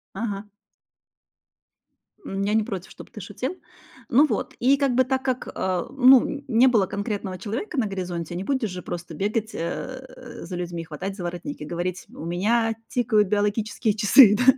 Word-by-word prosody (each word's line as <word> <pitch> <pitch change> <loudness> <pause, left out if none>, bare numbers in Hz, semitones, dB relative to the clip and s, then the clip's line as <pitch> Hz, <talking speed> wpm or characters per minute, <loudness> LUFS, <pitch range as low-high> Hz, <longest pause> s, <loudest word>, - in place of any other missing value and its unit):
Ага. 205 -1 -4 1.7
М, 195 +1 -3
я 205 +1 0
не 220 - +4
против, 190 -5 -6
чтоб - - -12
ты 210 - -9
шутил. 255 - -4 0.5
Ну 285 +6 +6
вот, - - -3
и 265 +3 +5
как 275 -3 +1
бы 260 +1 +4
так 260 0 -1
как, 255 -1 -1
э, 185 -2 -1
ну, 270 +1 +5
не 235 +1 +5
было 225 -7 +4
конкретного 200 -2 -4
человека 260 - -4
на 225 - +2
горизонте, 175 -4 -4
не 185 - -4
будешь 255 -4 0
же 180 0 -6
просто 170 -1 -6
бегать, 215 +5 -1
э, 255 +8 -6
за 180 - -6
людьми, 175 -1 -4
хватать 180 +5 -6
за 190 - -6
воротник 175 - -5
и - - -5
говорить: 175 +3 -4
"У - - -8
меня 225 +6 +1
тикают 220 -5 +2
биологические 210 +2 0
часы". 210 +1 +7
Да? 250 - +1
210 Hz, 175 wpm, -24 LUFS, 185-250 Hz, 1.7 s, часы